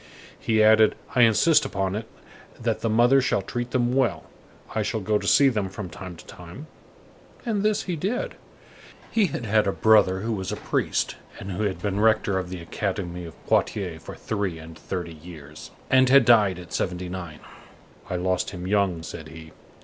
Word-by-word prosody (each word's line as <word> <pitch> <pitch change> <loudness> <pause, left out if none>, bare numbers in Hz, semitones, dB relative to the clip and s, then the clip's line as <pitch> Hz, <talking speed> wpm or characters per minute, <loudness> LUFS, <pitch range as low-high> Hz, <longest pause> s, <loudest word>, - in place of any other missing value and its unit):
He 110 -1 +2
added: 110 0 +5 0.2
"I 125 - +3
insist 120 +8 +5
upon 95 -1 -2
it 110 +1 -5 0.5
that 115 -2 -1
the 115 - 0
mother 120 +5 +4
shall 125 -6 0
treat 120 +4 -4
them 120 -1 0
well. 115 -12 +1 0.5
I 110 - 0
shall 110 +2 -2
go 105 +1 0
to - - -5
see 140 - +6
them 105 -7 0
from 95 -2 -7
time 90 -2 -8
to - - -14
time." 90 - -11 0.8
And 215 -4 0
this 210 0 +1
he 180 - -3
did. 200 +10 -2 0.8
He 215 -4 +3
had 125 -6 -5
had 110 -1 +2
a - - +2
brother 100 -3 +4
who 115 +2 -2
was 95 -3 -4
a - - -2
priest, - - -1 0.2
and 95 - -6
who 90 - -3
had 95 -3 -3
been 100 -1 -1
rector 110 -3 +2
of 90 -1 -5
the 90 -1 -6
Academy 90 -1 -4
of 80 - -10
Poitiers 90 -6 0
for - - -9
three 100 -6 -3
and 80 0 -11
thirty 85 0 -5
years, 80 -2 -11 0.2
and 130 0 +5
had 135 -2 +6
died 105 -6 +5
at 90 -1 -11
seventy 90 0 -2
nine. 85 -4 -7 0.7
"I - - -2
lost 90 0 0
him 90 -1 -7
young," 95 -4 +1
said 80 -1 -8
he. 80 0 -12
100 Hz, 190 wpm, -25 LUFS, 90-115 Hz, 0.8 s, see